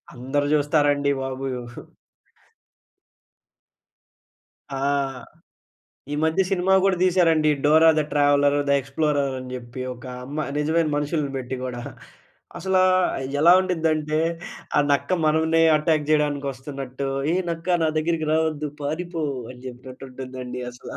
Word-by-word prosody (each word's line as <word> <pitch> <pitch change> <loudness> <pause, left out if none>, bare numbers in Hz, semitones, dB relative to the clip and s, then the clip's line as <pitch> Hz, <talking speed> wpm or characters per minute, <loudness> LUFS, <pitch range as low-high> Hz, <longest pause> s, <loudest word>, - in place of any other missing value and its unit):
అందరు 135 +3 -1
చూస్తారండి 145 -1 +2
బాబు. 135 0 -4 0.2
ఉహూ. 120 0 -10 2.9
ఆ! - - -3 1.4
ఈ - - -1
మధ్య 160 +4 +1
సినిమా 190 0 +1
గూడా 195 -1 +3
తీశారండి. 165 -4 +3
Dora 160 +2 +6
the - - +3
traveller 145 0 +3
the - - +3
explorer 140 +1 -1
అని 130 0 -8
చెప్పి 125 0 -8
ఒక 120 - -15 0.2
అమ్మా 145 +4 -4 0.2
నిజమైన 160 +2 +1
మనుషుల్ని 150 0 -1
బెట్టి 130 0 -4
గూడా. 125 -1 -4 0.8
అసలా 190 -1 +2 0.6
ఎలా 170 +3 +7
ఉండి‌దంటే 160 -4 0 0.6
ఆ - - +6
నక్క 140 0 +1 0.2
మనల్నే 160 +1 +3
అటాక్ 155 -1 +1
చేయడానికి 145 -2 +1
వస్తునట్టు 135 0 -6 0.2
ఏ - - +2 0.2
నక్క 170 +2 0
నా - - +2
దగ్గరికి 160 0 -1
రావొద్దు 155 -1 0
పారిపో 165 +3 -3 0.3
అని 125 -1 -12
చెప్పినట్టు 130 +1 -10
ఉంటుందండి. 125 -1 -7
అసలా 125 - -10
145 Hz, 120 wpm, -23 LUFS, 135-160 Hz, 2.9 s, ఎలా